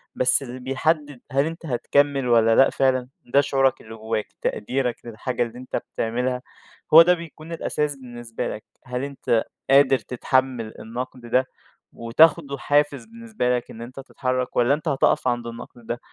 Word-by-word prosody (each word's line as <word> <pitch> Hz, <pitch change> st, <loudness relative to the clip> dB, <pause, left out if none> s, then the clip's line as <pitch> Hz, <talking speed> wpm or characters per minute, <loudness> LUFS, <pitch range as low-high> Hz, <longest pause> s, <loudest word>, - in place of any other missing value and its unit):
بس 130 Hz, +2 st, +2 dB
اللي 125 Hz, 0 st, -8 dB
بيحدِّد 145 Hz, +1 st, -1 dB
هل 140 Hz, +2 st, +2 dB
أنت 165 Hz, +1 st, -6 dB
هتكمل 140 Hz, 0 st, +1 dB
والَّا 115 Hz, -1 st, +4 dB
لأ 135 Hz, -, +6 dB
فعلًا؟ 130 Hz, -2 st, +1 dB, 0.2 s
ده 140 Hz, +4 st, +4 dB
شعورك 135 Hz, -2 st, +1 dB
اللي 110 Hz, 0 st, -10 dB
جوّاك. 110 Hz, -1 st, -3 dB, 0.2 s
تقديرك 125 Hz, +1 st, -1 dB
للحاجة 120 Hz, +2 st, -2 dB
اللي 115 Hz, +1 st, -7 dB
أنتَ 130 Hz, -, -6 dB, 0.2 s
بتعملها، 125 Hz, +2 st, -1 dB, 0.5 s
هو 165 Hz, -, +12 dB
ده 175 Hz, +2 st, +5 dB
بيكون 165 Hz, -1 st, -9 dB
الأساس 150 Hz, -3 st, -2 dB
بالنسبة 120 Hz, -3 st, -6 dB
لك. 105 Hz, -, -6 dB, 0.2 s
هل 125 Hz, +1 st, -3 dB
أنت 135 Hz, -5 st, 0 dB, 0.3 s
قادر 135 Hz, -1 st, +5 dB
تتحمل 125 Hz, -1 st, -1 dB
النقد 125 Hz, +2 st, -6 dB
ده، 125 Hz, +2 st, +2 dB, 0.5 s
وتاخده 140 Hz, +4 st, +3 dB
حافز 145 Hz, 0 st, +1 dB
بالنسبة 225 Hz, -, -2 dB
لك 120 Hz, -, -8 dB
إن 115 Hz, -, -10 dB
أنتَ 130 Hz, +3 st, -9 dB
تتحرك؟ 130 Hz, -1 st, -3 dB
والّا 120 Hz, +3 st, +4 dB
أنت 155 Hz, +3 st, -3 dB
هتقف 135 Hz, -2 st, +2 dB
عند 120 Hz, -1 st, -1 dB
النقد 115 Hz, 0 st, -10 dB
ده 120 Hz, +1 st, -4 dB
130 Hz, 160 wpm, -23 LUFS, 120-140 Hz, 0.5 s, هو